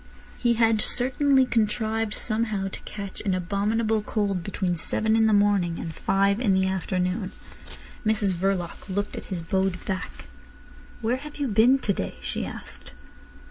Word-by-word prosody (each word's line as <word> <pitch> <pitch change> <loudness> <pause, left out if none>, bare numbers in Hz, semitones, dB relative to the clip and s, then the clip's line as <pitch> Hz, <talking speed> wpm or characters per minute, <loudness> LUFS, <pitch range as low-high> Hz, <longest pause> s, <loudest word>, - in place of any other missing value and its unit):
He 240 -1 +2
had 225 -1 +3
certainly 265 +2 +3
contrived 220 -1 0
somehow 215 -4 -1
to - - -8
catch 200 -2 -6
an 195 -3 0
abominable 210 +4 0
cold 200 -4 -1
between 190 -2 -1
seven 220 +6 0
in 225 0 +4
the - - +3
morning 200 -5 +3
and 165 - -5
five 200 +5 +2
in 210 -6 +3
the 190 0 +3
afternoon. 185 +1 -1 0.7
Mrs 215 -3 +2
Verloc 180 +1 -2
looked 200 +2 -2
at - - -7
his 180 -4 -4
bowed 190 +1 -1
back. 190 -2 -4 0.8
"Where 235 +3 +1
have 295 +2 -9
you 285 -2 -1
been 230 +4 +5
to 210 -6 0
day?" 90 - -4
she 65 -1 -3
asked. - - -10
205 Hz, 155 wpm, -26 LUFS, 190-225 Hz, 0.8 s, been